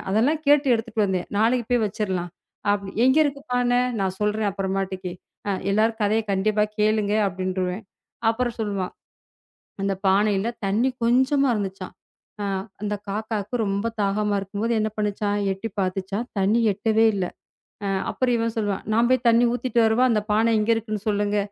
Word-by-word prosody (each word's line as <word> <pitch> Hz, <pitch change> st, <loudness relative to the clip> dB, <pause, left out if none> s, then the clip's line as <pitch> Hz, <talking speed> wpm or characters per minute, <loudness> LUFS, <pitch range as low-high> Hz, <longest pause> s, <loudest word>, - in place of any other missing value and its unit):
"அதெல்லாம் 280 Hz, +10 st, +2 dB
கேட்டு 290 Hz, -1 st, +5 dB
எடுத்துட்டு 225 Hz, -1 st, -1 dB
வந்தேன். 185 Hz, -2 st, -2 dB
நாளைக்கு 230 Hz, +2 st, +2 dB
போய் 235 Hz, -3 st, +3 dB
வச்சிரலாம்." 190 Hz, -4 st, -3 dB, 0.4 s
அப்பிடி 200 Hz, -1 st, -3 dB
"எங்க 260 Hz, +3 st, +4 dB
இருக்கு 280 Hz, -1 st, -2 dB
பானை?" 245 Hz, 0 st, +3 dB, 0.2 s
"நான் 190 Hz, -1 st, -1 dB
சொல்றேன் 210 Hz, 0 st, +1 dB
அப்புறமேட்டுக்கு" 190 Hz, -2 st, -3 dB, 0.4 s
"அ -, -, +1 dB, 0.2 s
எல்லார் 220 Hz, +2 st, +2 dB
கதைய 215 Hz, +2 st, +2 dB
கண்டிப்பா 210 Hz, +2 st, +2 dB, 0.2 s
கேளுங்க" 210 Hz, -1 st, +2 dB
அப்படின்றுவேன். 185 Hz, +1 st, -3 dB, 0.5 s
அப்புறம் 240 Hz, +1 st, 0 dB
சொல்லுவான், 200 Hz, -4 st, -2 dB, 0.9 s
"அந்தப் 195 Hz, -1 st, -1 dB
பானையில 200 Hz, +2 st, +3 dB, 0.2 s
தண்ணி 215 Hz, +6 st, +2 dB
கொஞ்சமா 265 Hz, +4 st, +3 dB
இருந்துச்சாம். 195 Hz, -2 st, -4 dB, 0.5 s
அ -, -, -2 dB, 0.4 s
அந்தக் 210 Hz, -1 st, -3 dB
காக்காக்கு 215 Hz, +1 st, -3 dB
ரொம்ப 200 Hz, +2 st, -1 dB
தாகமா 205 Hz, +1 st, +1 dB
இருக்கும்போது 205 Hz, +4 st, -3 dB
என்ன 215 Hz, -, +1 dB
பண்ணுச்சாம்? 205 Hz, -1 st, -1 dB, 0.2 s
எட்டி 195 Hz, +4 st, -5 dB
பாத்துச்சாம். 195 Hz, +4 st, -2 dB
தண்ணி 205 Hz, +5 st, +3 dB
எட்டவே 220 Hz, +3 st, +2 dB
இல்ல." 190 Hz, -2 st, -1 dB, 0.6 s
அ -, -, -1 dB, 0.2 s
அப்புறம் 250 Hz, -2 st, +1 dB
இவன் 230 Hz, 0 st, -1 dB
சொல்லுவான், 205 Hz, -3 st, -1 dB
"நான் 235 Hz, +2 st, +3 dB
போய்த் 255 Hz, -1 st, +2 dB
தண்ணி 230 Hz, +1 st, +5 dB
ஊத்திட்டு 245 Hz, -1 st, 0 dB
வரவா? 220 Hz, +3 st, +3 dB
அந்தப் 210 Hz, -1 st, -1 dB
பானை 225 Hz, +2 st, +3 dB
இங்க 210 Hz, -, -1 dB
இருக்குன்னு 215 Hz, -2 st, -3 dB
சொல்லுங்க." 205 Hz, 0 st, 0 dB
210 Hz, 150 wpm, -24 LUFS, 195-230 Hz, 0.9 s, கேட்டு